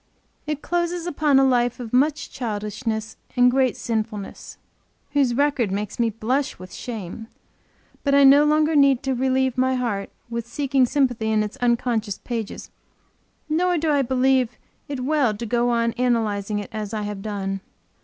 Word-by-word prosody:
It 300 -1 -3
closes 345 0 -1
upon 300 -4 +2
a 270 - +5
life 245 -2 +2
of 235 -2 -7
much 290 +4 +1
childishness 220 -1 -4 0.2
and 250 0 +6
great 260 -2 +2
sinfulness, 215 -3 -4 0.5
whose 275 -4 +2
record 275 -5 +1
makes 205 +3 -4
me 235 -1 +3
blush 250 +6 -1
with 185 0 -11
shame 225 -2 -6 0.8
but 280 -1 +2
I 280 - +6
no 275 +2 +8
longer 305 +1 +3
need 275 -2 +4
to 270 -1 0
relieve 260 0 +1
my 260 0 +2
heart 225 -6 -2 0.2
with 235 0 -4
seeking 270 0 +1
sympathy 245 -5 +1
in 215 -1 +2
its 210 +3 -5
unconscious 235 -4 0
pages 230 -4 -5 0.8
nor 350 +3 +1
do 315 0 +1
I 285 -1 +3
believe 255 -2 +2 0.3
it 280 -3 -4
well 270 -8 +2
to 235 - -5
go 240 +2 +1
on 235 -1 +1
analyzing 220 -4 0
it 205 - -5
as 215 0 -4
I 210 - -2
have 205 -1 -5
done. 195 -2 -3
245 Hz, 165 wpm, -23 LUFS, 220-275 Hz, 0.8 s, no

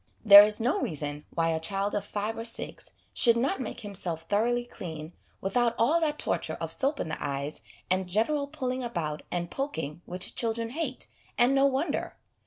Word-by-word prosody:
There 200 -1 +12
is 210 0 0
no 255 - +1
reason 145 -2 -3
why 165 0 0
a 160 - 0
child 195 +5 -1
of 205 - -1
five 210 +2 -3
or 225 - -5
six 230 - 0 0.2
should 235 -2 +4
not 260 +2 0
make 240 - -5
himself 180 -6 -4
thoroughly 240 +4 +1
clean 160 -7 -8 0.3
without 235 +4 +1
all 310 +9 +3
that 300 -2 0
torture - - -1
of - - -3
soap 280 +1 0
in - - -2
the 160 - -4
eyes 140 +1 -3 0.3
and 185 0 0
general 280 +9 +1
pulling 260 -3 -3
about 165 -10 -3
and 175 -1 -3
poking 165 - -4
which 180 +1 -3
children 230 0 -1
hate, 285 -3 -3 0.3
and 245 +2 +4
no 275 0 +5
wonder. 280 +3 -1
220 Hz, 185 wpm, -28 LUFS, 175-255 Hz, 0.3 s, There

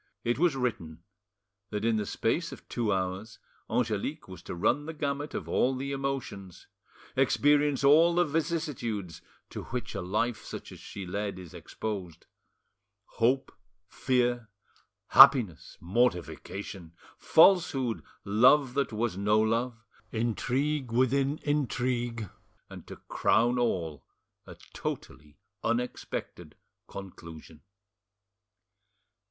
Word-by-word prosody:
It 120 +3 0
was 170 -4 +3
written 85 -11 -3 0.7
that 105 +1 -3
in 115 -1 +2
the 105 -2 -2
space 165 +9 -1
of - - -11
two 115 -4 -1
hours 95 +3 -3 0.3
Angelique 120 +5 -1
was 95 -3 -10
to - - -7
run 145 - +1
the 160 - -6
gamut 145 0 -3
of - - -4
all 130 +1 +2
the 135 +2 -4
emotions, 135 - -5 0.5
experience 145 +1 +3
all 160 +5 +6
the 175 0 +4
vicissitudes 145 - -3 0.3
to - - -6
which 125 0 -5
a - - -3
life 110 +6 -1
such - - -8
as - - -11
she 100 -2 -8
led 100 +1 -3
is 90 -3 -11
exposed: 95 -7 -6 0.9
hope, 130 +4 +1 0.3
fear, 120 -1 0 0.6
happiness, 105 - +6
mortification, 95 -2 -2 0.3
falsehood, 160 - +4 0.2
love 125 +6 +4
that 140 -2 0
was 110 -2 -1
no 105 +2 +3
love, 115 +2 0 0.3
intrigue 125 +4 -1
within 135 +4 +2
intrigue, 125 -5 -1 0.4
and, - - -10
to - - -8
crown 120 +2 +2
all, 85 - -1 0.4
a - - -10 0.2
totally 75 0 -6 0.3
unexpected 120 +2 -3 0.3
conclusion. 85 -5 -10
120 Hz, 115 wpm, -29 LUFS, 100-135 Hz, 0.9 s, all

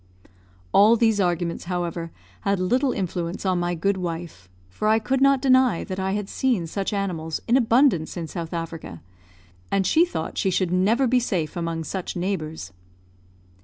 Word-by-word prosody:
All 215 +3 +7
these 225 -2 +2
arguments, 175 -2 -1
however, 175 -2 -3 0.3
had 200 -2 0
little 250 +9 +1
influence 180 -2 -3
on 185 -2 +1
my 175 0 -1
good 195 +4 0
wife, 165 - -6 0.2
for 90 - -3
I 220 +1 +5
could 255 +5 -1
not 275 -1 +4
deny 255 -7 +4
that 190 -2 -5
I 190 0 -1
had 205 -1 -2
seen 235 -6 0
such 195 +4 -3
animals 175 -6 -2
in 235 - +3
abundance 235 - +3
in 170 - -3
South 165 0 -6
Africa; 165 - -6 0.7
and 195 -1 +1
she 320 - +4
thought 355 - -3
she 195 - +1
should 185 -1 0
never 210 +9 +3
be 250 0 +3
safe 180 -10 -2
among 165 -1 -3
such 185 +3 -5
neighbours. 160 - -3
185 Hz, 165 wpm, -24 LUFS, 170-220 Hz, 0.7 s, All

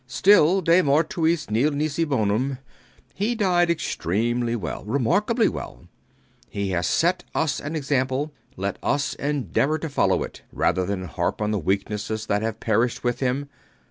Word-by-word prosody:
Still, 190 +4 +5
de 170 +1 +5
mortuis 160 +2 +1
nil 120 +8 +3
nisi 155 +2 -1
bonum. 130 0 0 0.6
He 215 +5 -1
died 180 -5 +2
extremely 120 - 0
well, 95 -9 -5
remarkably 200 - +1
well. - - -6 0.6
He 100 -1 -3
has 90 -1 0
set 175 +2 +1
us 155 -4 0
an 150 +3 -5
example: 140 0 -1 0.2
let 100 +1 -3
us 140 -1 0
endeavor 145 - 0
to 160 - -5
follow 140 - +2
it - - -9
rather 90 -1 0
than 100 -2 -2
harp 85 - -2
on 105 0 0
the 105 - 0
weaknesses 105 +4 -2
that 105 -1 0
have 110 -1 -3
perished 115 +2 0
with 120 -1 0
him. 135 +2 -1
135 Hz, 150 wpm, -24 LUFS, 110-160 Hz, 0.6 s, Still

